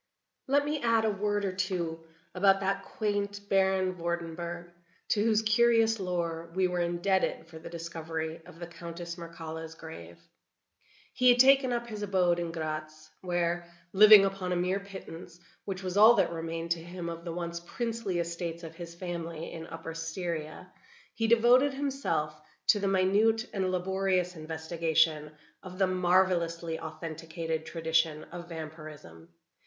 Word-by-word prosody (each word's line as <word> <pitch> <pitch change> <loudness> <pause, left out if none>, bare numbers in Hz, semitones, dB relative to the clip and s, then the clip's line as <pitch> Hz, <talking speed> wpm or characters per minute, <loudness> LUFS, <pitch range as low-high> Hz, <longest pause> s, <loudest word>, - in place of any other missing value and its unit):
Let 285 +2 +3
me 295 -1 -2
add 230 -1 +3
a 215 - +2
word 205 0 -1
or 190 - 0
two 180 -4 -2 0.3
about 195 +1 +4
that 195 0 0
quaint 205 -1 -3
Baron 190 -1 +2
Vordenburg, 170 0 -4 0.4
to 210 - +2
whose 220 -1 +3
curious 225 0 +4
lore 170 -3 -2
we 190 -1 +3
were 180 0 -2
indebted 175 +2 0
for 160 -1 -11
the 160 - -9
discovery 165 -1 -5
of - - -13
the 170 - -6
Countess 170 0 -7
Mircalla's 165 -1 -8
grave. 85 - -10 1.0
He 250 +1 +4
had 245 - +6
taken 265 0 +6
up 240 0 -1
his 215 -3 -7
abode 185 -4 +2
in 170 -1 -3
Gratz, 155 -1 -5
where, 175 -1 -1 0.2
living 210 0 +9
upon 195 -2 -2
a - - +1
mere 180 +2 0
pittance, 180 -3 -10 0.3
which 190 -1 -5
was 185 +1 -3
all 220 +3 +9
that 195 -5 +2
remained 165 0 -4
to 170 -1 +1
him 175 0 -6
of 170 0 -6
the 170 - -5
once 170 0 -4
princely 225 +1 -3
estates 170 0 -3
of 165 -1 -8
his 170 0 -9
family, 170 -2 -5
in 165 0 -7
Upper 165 0 -7
Styria, 165 +1 -5 0.4
he 225 - 0
devoted 245 +4 +5
himself 265 - -2 0.3
to 205 - +6
the 200 - 0
minute 205 +4 +3
and 190 -2 0
laborious 185 0 0
investigation 160 -1 0 0.3
of 185 -1 -10
the 195 - +4
marvelously 175 -3 +1
authenticated 160 0 -5
tradition 160 -2 0
of 170 0 -8
Vampirism. 155 - -9
175 Hz, 150 wpm, -29 LUFS, 165-195 Hz, 1.0 s, living